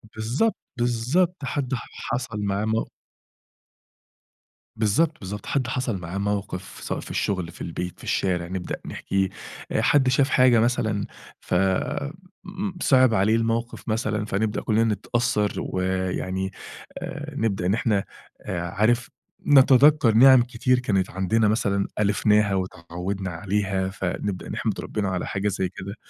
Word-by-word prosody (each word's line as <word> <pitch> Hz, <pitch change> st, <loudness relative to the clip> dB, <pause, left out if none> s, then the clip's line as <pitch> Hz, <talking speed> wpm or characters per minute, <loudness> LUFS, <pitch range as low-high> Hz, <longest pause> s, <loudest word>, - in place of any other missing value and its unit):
بالضبط، 120 Hz, -, 0 dB, 0.2 s
بالضبط، 125 Hz, +10 st, +1 dB
حد 135 Hz, -1 st, -2 dB
ح 125 Hz, -, -3 dB, 0.3 s
حصَل 120 Hz, -4 st, -3 dB
معاه 100 Hz, +1 st, 0 dB
مو 110 Hz, +1 st, 0 dB, 1.9 s
بالضبط، 145 Hz, +10 st, +1 dB
بالضبط. 105 Hz, +2 st, -6 dB
حد 130 Hz, -4 st, 0 dB
حصل 125 Hz, -5 st, -1 dB
معاه 90 Hz, +1 st, -6 dB
موقف، 100 Hz, -2 st, -3 dB
سواء -, -, -3 dB
في -, -, -8 dB
الشغل، 90 Hz, -4 st, -1 dB
في -, -, -14 dB
البيت، 90 Hz, +1 st, -5 dB
في -, -, -14 dB
الشارع، 90 Hz, -3 st, 0 dB
نبدأ 90 Hz, 0 st, -4 dB
نحكيه. 95 Hz, -1 st, -1 dB, 0.5 s
حد 135 Hz, -3 st, +4 dB
شاف 135 Hz, +2 st, +3 dB
حاجة 125 Hz, -3 st, +5 dB
مثلًا 110 Hz, -3 st, +1 dB, 0.3 s
فصِعب 145 Hz, -, 0 dB
عليه 110 Hz, +3 st, +3 dB
الموقف 115 Hz, +1 st, -2 dB
مثلًا، 110 Hz, -1 st, -1 dB
فنبدأ 105 Hz, +1 st, -1 dB
كلنا 110 Hz, 0 st, +2 dB
نتأثر، 110 Hz, 0 st, 0 dB
ويعني 95 Hz, 0 st, -2 dB, 0.5 s
آآ، -, -, -6 dB
نبدأ 100 Hz, -5 st, 0 dB
إن 95 Hz, -, +2 dB
إحنا 110 Hz, -4 st, +1 dB, 0.4 s
عارف، 105 Hz, +6 st, 0 dB, 0.4 s
نتذكَّر 135 Hz, -2 st, +6 dB
نِعَم 130 Hz, +1 st, +8 dB
كتير 125 Hz, +1 st, +1 dB
كانت 95 Hz, -6 st, 0 dB
عندنا 100 Hz, +4 st, +1 dB
مثلًا 100 Hz, -2 st, +1 dB
ألفناها 105 Hz, 0 st, +3 dB
واتعودنا 90 Hz, +1 st, -4 dB
عليها، 95 Hz, +1 st, -1 dB
فنبدأ 95 Hz, 0 st, -4 dB
نحمد -, -, -2 dB
ربنا 100 Hz, -3 st, -2 dB
على 90 Hz, -1 st, -2 dB
حاجة 100 Hz, +1 st, -2 dB
زي 95 Hz, -2 st, -1 dB
كده. 95 Hz, +3 st, -8 dB
105 Hz, 125 wpm, -24 LUFS, 95-125 Hz, 1.9 s, نِعَم